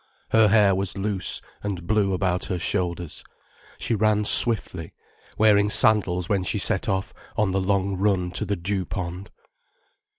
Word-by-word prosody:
Her 110 -1 +4
hair 105 -2 +3
was 95 +1 -3
loose 100 -1 0 0.2
and 95 -4 -6
blew 105 -1 0
about 90 -1 -2
her 90 - -4
shoulders, 85 -2 -3 0.5
she - - -2
ran 105 -1 +1
swiftly, 95 -8 +5 0.4
wearing 105 -1 +3
sandals 95 -5 +2
when 100 -2 0
she 90 - -2
set 100 +3 -1
off 95 +3 -3 0.2
on 105 -3 0
the 95 +1 -1
long 100 0 -1
run 95 -2 -1
to 90 - -2
the 100 - -2
dew 95 +2 -3
pond. 90 0 -7
100 Hz, 155 wpm, -23 LUFS, 90-105 Hz, 0.5 s, swiftly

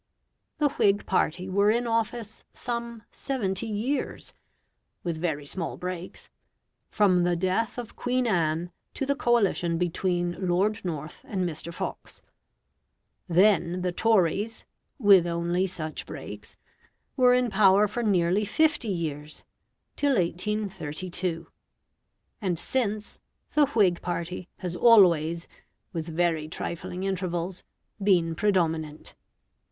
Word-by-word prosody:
The 300 -2 +3
Whig 205 -6 +2
party 185 0 0
were 200 +2 +3
in 235 +3 +2
office 230 -1 -2
some 235 -2 -4
seventy 225 -6 -2
years 230 +6 -3 0.7
(with 170 -2 -2
very 155 -3 -2
small 165 +3 -3
breaks) 180 0 -6 0.6
from 185 -4 +3
the 175 0 +2
death 185 +7 0
of 240 -2 -7
Queen 250 0 0
Anne 170 -4 0 0.2
to 275 - -2
the 280 - +2
coalition 200 - +2
between 175 +1 -1
Lord 200 +5 +1
North 155 -4 -5
and 185 -3 -1
Mr. 165 +1 -6
Fox; - - -6 1.1
then 180 -1 +3
the 180 - 0
Tories 210 +2 +1 0.3
(with 200 - +6
only 170 +2 0
such 155 -4 -5
breaks), - - -9 0.6
were 250 -2 +5
in 250 -2 +1
power 200 0 +5
for 225 +4 -3
nearly 190 -2 +2
fifty 300 +4 +2
years, 155 -5 -4 0.5
till 285 -2 +2
1832; 180 -2 -2 1.0
and 185 -4 0
since, 215 0 -2 0.3
the 295 -1 +4
Whig 200 -10 +2
party 175 +1 -4
has 180 -2 -4
always, 170 -7 +5 0.5
with 165 -1 -3
very 165 -2 0
trifling 170 +3 -5
intervals, 185 -2 -2 0.4
been 175 -5 +3
predominant. 165 -5 0
185 Hz, 115 wpm, -27 LUFS, 170-215 Hz, 1.1 s, with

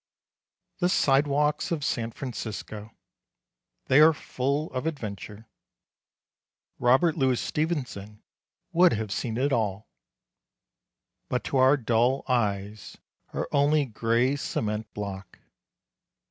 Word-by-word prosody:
The 180 -1 +2
sidewalks 145 -1 +2
of 160 -4 -2
San 115 -3 -1
Francisco. 110 -4 -6 1.0
They 130 - +4
are 160 +1 +7
full 140 +2 -2
of 130 +4 -2
adventure. 110 - -6 1.3
Robert 130 +7 +3
Louis 130 -4 +1
Stevenson 125 - -3 0.5
would 175 +1 +5
have 110 -2 -3
seen 115 +1 -2
it 135 +2 +1
all. 105 -3 -1 1.4
But 125 - -1
to 135 - -1
our 130 +2 +5
dull 120 +2 +1
eyes 105 -4 -2 0.3
are - - -3
only 145 +1 +3
gray 115 +3 +1
cement 110 -5 -3
block. 100 -2 -6
125 Hz, 105 wpm, -27 LUFS, 110-145 Hz, 1.4 s, are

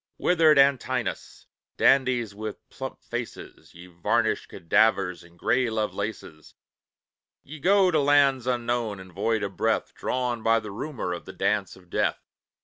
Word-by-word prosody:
Withered 160 -4 +4
Antinous, 130 -4 +1 0.3
dandies 125 -5 +3
with 105 +1 -7
plump - - -8
faces, - - -7
Ye 85 +1 -11
varnished 85 -2 -1
cadavers, 95 -1 +1
and 85 0 -19
grey 125 +6 +1
Lovelaces, 105 -7 -4 0.9
Ye 155 +2 -10
go 190 +3 +4
to 155 - +2
lands 140 -3 +3
unknown 120 -4 -1
and 95 -1 -12
void 105 +3 0
of 100 -1 -4
breath, - - 0
Drawn 125 -2 -2
by 115 +1 +3
the 105 -2 -8
rumour 110 -4 -4
of 85 - -7
the - - -9
Dance 105 -3 -1
of 90 -2 -20
Death. - - +1
115 Hz, 145 wpm, -26 LUFS, 100-130 Hz, 0.9 s, Withered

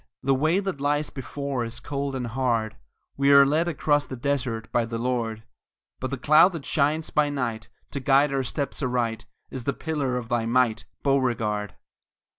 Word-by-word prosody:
The 135 +1 +3
way 155 +7 +2
that 195 -8 -4
lies 145 +1 0
before 140 -1 -4
Is 115 0 -6
cold 140 -1 -3
and 125 -2 -3
hard; 115 -2 -1 0.4
We 140 +1 +4
are 140 0 +9
led 155 +5 +1
across 145 -3 +1
the 130 - -6
desert 125 -3 -2
By 120 - +2
the 115 0 -4
Lord! 115 -2 -2 0.6
But 130 - -3
the 140 - -3
cloud 155 +8 +5
that 160 -5 -6
shines 155 +2 0
by 150 -1 +2
night 120 -5 -3 0.2
To 140 - -3
guide 140 +2 +3
our 135 - +1
steps 140 +3 -3
aright, 120 -4 -1 0.2
Is 130 -3 -6
the 140 - +1
pillar 140 -5 -2
of 120 -2 -5
thy 115 -1 0
might, 120 -2 +1 0.2
Beauregard! 115 -7 0
135 Hz, 180 wpm, -25 LUFS, 120-145 Hz, 0.6 s, are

